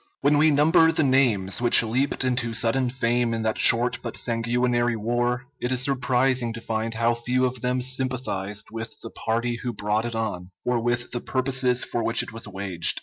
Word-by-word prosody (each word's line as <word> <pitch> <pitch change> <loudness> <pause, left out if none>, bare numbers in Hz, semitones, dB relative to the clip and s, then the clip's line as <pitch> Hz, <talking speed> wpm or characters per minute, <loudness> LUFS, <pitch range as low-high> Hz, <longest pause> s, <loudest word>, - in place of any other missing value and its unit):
] - - -51
When 145 +1 +3
we 155 +1 +5
number 160 +3 +4
the 160 -1 +1
names 120 -8 +2
which 120 -1 +6
leaped 130 +5 0
into 125 -3 -1
sudden 120 +3 +1
fame 120 -2 0
in 110 - -3
that 110 0 -1
short 120 +2 +4
but 115 - -6
sanguinary 120 +1 0
war, 120 +3 -1
it 125 - -3
is 130 0 +1
surprising 130 -3 +1
to 115 - -7
find 115 0 -3
how 115 +1 +2
few 125 +2 0
of 125 -1 -3
them 125 0 -1
sympathized 125 -6 -2
with 115 0 -6
the 115 - -8
party 120 +1 -2
who 120 0 -5
brought 105 +2 -1
it 120 -1 -4
on, 100 -5 -4 0.2
or 125 -1 +1
with 120 +1 -1
the 120 - -3
purposes 130 -1 0
for 120 - -3
which 115 +1 +2
it - - -10
was 115 -1 -5
waged. 95 -3 0
120 Hz, 200 wpm, -24 LUFS, 115-130 Hz, 0.2 s, which